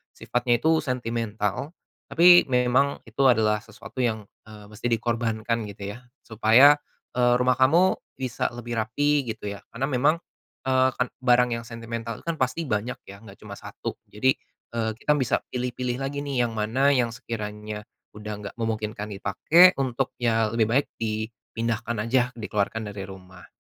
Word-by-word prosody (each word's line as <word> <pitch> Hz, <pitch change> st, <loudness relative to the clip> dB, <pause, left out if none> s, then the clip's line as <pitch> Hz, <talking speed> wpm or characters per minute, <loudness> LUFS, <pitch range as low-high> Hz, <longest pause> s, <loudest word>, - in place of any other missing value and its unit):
sifatnya 120 Hz, -1 st, 0 dB
itu 160 Hz, 0 st, +4 dB
sentimental, 115 Hz, -, -2 dB, 0.4 s
tapi 175 Hz, +1 st, +8 dB
memang 125 Hz, +3 st, +2 dB
itu 130 Hz, +5 st, -1 dB
adalah 110 Hz, -4 st, +3 dB
sesuatu 115 Hz, +3 st, -11 dB
yang, 110 Hz, -3 st, -1 dB, 0.2 s
eee, 105 Hz, -1 st, -12 dB
mesti 105 Hz, +3 st, -4 dB
di 115 Hz, -, +3 dB
korbankan, 115 Hz, -1 st, -1 dB
gitu 100 Hz, 0 st, -7 dB
ya. -, -, -11 dB, 0.2 s
Supaya, 115 Hz, +6 st, +6 dB, 0.4 s
eee, 125 Hz, 0 st, +4 dB
rumah 125 Hz, 0 st, +3 dB
kamu 170 Hz, +8 st, +4 dB, 0.2 s
bisa 130 Hz, -2 st, -1 dB
lebih 120 Hz, 0 st, -5 dB
rapih, 145 Hz, +6 st, +1 dB
gitu 110 Hz, -1 st, -7 dB
ya, 100 Hz, -2 st, -9 dB
karena 130 Hz, +4 st, -2 dB
memang, 145 Hz, +3 st, +3 dB, 0.5 s
eee, 130 Hz, 0 st, +4 dB
kan 125 Hz, -, 0 dB, 0.2 s
barang 125 Hz, -1 st, +4 dB
yang 115 Hz, -, -6 dB
sentimental 115 Hz, -1 st, -6 dB
itu -, -, -21 dB
kan 165 Hz, -, 0 dB
pasti 135 Hz, +5 st, -1 dB
banyak 110 Hz, +1 st, -2 dB
ya, 100 Hz, +2 st, -12 dB
enggak -, -, -13 dB
cuma -, -, -9 dB
1. -, -, -7 dB, 0.2 s
Jadi, 130 Hz, +6 st, +2 dB, 0.4 s
eee, 110 Hz, -1 st, 0 dB
kita 150 Hz, -, +1 dB
bisa 130 Hz, -4 st, +1 dB
pilih-pilih 125 Hz, 0 st, -3 dB
lagi 140 Hz, +1 st, -3 dB
nih 140 Hz, -4 st, 0 dB
yang -, -, -7 dB
mana 130 Hz, +7 st, +2 dB
yang 125 Hz, -4 st, +2 dB
sekiranya 105 Hz, -2 st, -6 dB, 0.3 s
udah 105 Hz, 0 st, -6 dB
enggak 100 Hz, -, -7 dB
memungkinkan 110 Hz, -1 st, -3 dB
dipakai, 160 Hz, -, +5 dB
untuk 130 Hz, -1 st, -1 dB
ya 115 Hz, -2 st, +1 dB
lebih 115 Hz, -1 st, +2 dB
baik 135 Hz, +5 st, +2 dB
dipindahkan 115 Hz, +1 st, -3 dB
aja, 125 Hz, +1 st, +2 dB
dikeluarkan 105 Hz, -1 st, -2 dB
dari 100 Hz, -1 st, -7 dB
rumah. 90 Hz, -1 st, -13 dB
115 Hz, 160 wpm, -25 LUFS, 110-130 Hz, 0.5 s, tapi